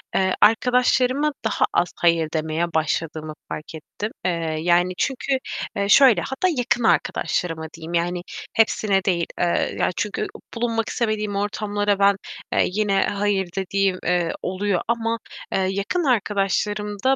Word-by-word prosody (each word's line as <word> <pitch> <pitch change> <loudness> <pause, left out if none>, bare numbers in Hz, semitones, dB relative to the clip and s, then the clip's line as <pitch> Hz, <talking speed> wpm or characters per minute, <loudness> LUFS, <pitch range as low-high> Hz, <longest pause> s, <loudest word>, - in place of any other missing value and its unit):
eee, 190 -1 +2
arkadaşlarıma 250 +5 +3
daha 220 - +2
az 175 - +2
"hayır" 165 -2 +2
demeye 160 +1 -1
başladığımı 155 0 -1 0.2
fark 155 +1 -6
ettim. 205 +7 -6
Eee, 165 -3 -1
yani, 175 +2 +3
çünkü, 270 0 0 0.4
eee, 200 0 0
şöyle, 240 -7 +7
hatta 265 +8 -1
yakın 240 -1 +1
arkadaşlarıma 165 -6 0
diyeyim 165 +1 -8
yani 175 +1 0 0.3
hepsine 210 -3 +2
değil. 170 -3 +1
Eee, 175 -1 +1
ya, - - +2
çünkü, 210 - -2 0.3
bulunmak 230 -1 -1
istemediğim 215 -3 -1
ortamlara 205 0 -1
ben, 200 0 +5 0.4
eee, - - +3
yine 200 0 +1
"hayır" 200 -2 0
dediğim, 195 -1 0
eee, 175 -2 +1
oluyor. 190 0 -1
Ama, 230 0 0 0.3
eee, - - +2
yakın 200 - -1
arkadaşlarımda, 210 0 0
200 Hz, 135 wpm, -22 LUFS, 175-225 Hz, 0.4 s, şöyle